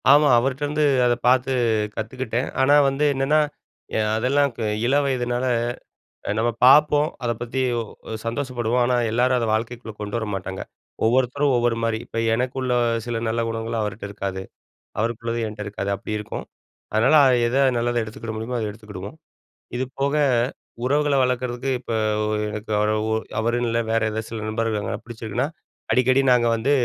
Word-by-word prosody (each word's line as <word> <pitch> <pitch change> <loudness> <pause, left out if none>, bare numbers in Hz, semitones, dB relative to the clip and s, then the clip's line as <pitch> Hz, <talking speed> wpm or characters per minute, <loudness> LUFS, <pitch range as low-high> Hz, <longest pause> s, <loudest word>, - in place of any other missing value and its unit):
ஆமா, 150 +1 +7
அவர்ட்டேருந்து 145 +4 -1 0.2
அத 120 0 +3
பார்த்து 130 +1 +3 0.4
கத்துக்கிட்டேன். 120 +2 -3
ஆனா 140 +2 +5
வந்து 135 +2 -1
என்னன்னா, 135 +3 +2 0.6
எ - - +2 0.2
அதெல்லாம் 140 +4 +2
க - - -12 0.3
இளவயதுனால 130 -2 +1 0.8
அ - - 0
நம்ம 120 +2 +2
பார்ப்போம் 150 +2 +6 0.2
அத 120 - +1
பத்தி 120 +2 -3 0.6
சந்தோஷப்படுவோம். 120 -1 -1
ஆனா 125 0 +2 0.2
எல்லாரும் 125 +2 +3
அத 115 - -1
வாழ்க்கைக்குள்ள 115 +1 -3
கொண்டு 105 +1 -3
வர 110 - -3
மாட்டாங்க. 95 0 -5 0.4
ஒவ்வொருத்தரும் 130 +4 +2
ஒவ்வொரு 120 -1 +1
மாரி 115 -1 0
இப்ப - - -5 0.2
எனக்குள்ள 125 +1 -1 0.3
சில 120 -1 -2
நல்ல 115 +1 0
குணங்கள் 115 0 -3
அவர்ட்ட 105 0 -4
இருக்காது, 95 -2 -4 0.6
அவருக்கு 115 +1 -1
உள்ளது 115 0 -1
என்ட்ட 105 -1 -7
இருக்காது 100 -1 -3
அப்டி 100 - -7
இருக்கும். 105 - -6 0.5
அதனால 115 +8 +5 0.3
எத 120 +3 -1 0.2
நல்லத 120 0 +1
எடுத்துக்கிட 110 +1 -7
முடியுமோ 115 +3 -3
அத 110 -2 -2
எடுத்துக்கிடுவோம். 105 +1 -9 0.6
இது 125 - 0 0.2
போக 140 +2 +1 0.7
உறவுகள 145 +2 +2
வளர்க்குறதுக்கு 125 +1 -1
இப்ப 120 - -5 0.3
ஒரு 105 0 0
எனக்கு 105 +1 -6
அவரு 105 +1 +2 0.2
ஒ - - +2 0.2
அவரு 115 +2 +1
இல்ல 115 +1 +1
வேற 115 - +2
ஏதாவது 110 +1 -4
சில 110 -2 -5
நண்பர்கள் 110 -2 -2
பிடிச்சிருக்குனா 115 +1 -3 0.4
அடிக்கடி 130 +1 +4
நாங்க 120 -1 +4
வந்து 115 +5 0
120 Hz, 150 wpm, -23 LUFS, 110-130 Hz, 0.8 s, ஆமா